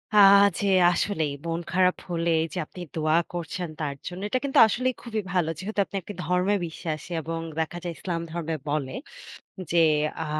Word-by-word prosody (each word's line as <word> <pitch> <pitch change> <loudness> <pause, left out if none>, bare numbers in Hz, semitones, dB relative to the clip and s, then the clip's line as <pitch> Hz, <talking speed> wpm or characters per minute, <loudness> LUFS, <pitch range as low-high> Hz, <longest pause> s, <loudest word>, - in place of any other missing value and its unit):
আহ 200 -1 +8
যে 200 - 0 0.3
আসলেই 160 -9 0
মন 165 0 -1
খারাপ 185 0 +3
হলেই 165 -1 +1
যে - - -5
আপনি 180 - -11
দোয়া 155 0 +2 0.2
করছেন 175 +1 -4
তার 145 -3 -2
জন্য 180 +1 -6
এটা 255 - +1
কিন্তু 280 -1 +2
আসলেই 255 +4 0
খুবই 220 -3 -2
ভালো। 175 -4 +2
যেহেতু 205 +3 -4
আপনি - - -11
একটি 205 - -8
ধর্মে 180 +4 +2
বিশ্বাসী 160 0 -6
এবং 165 +1 -4 0.2
দেখা 160 +2 -2
যায় 175 -1 -3
ইসলাম 170 -3 -3
ধর্মে 165 -1 -3
বলে 145 -3 -1 0.8
যে 170 - +4 0.4
আ - - -5
175 Hz, 175 wpm, -26 LUFS, 160-195 Hz, 0.8 s, আহ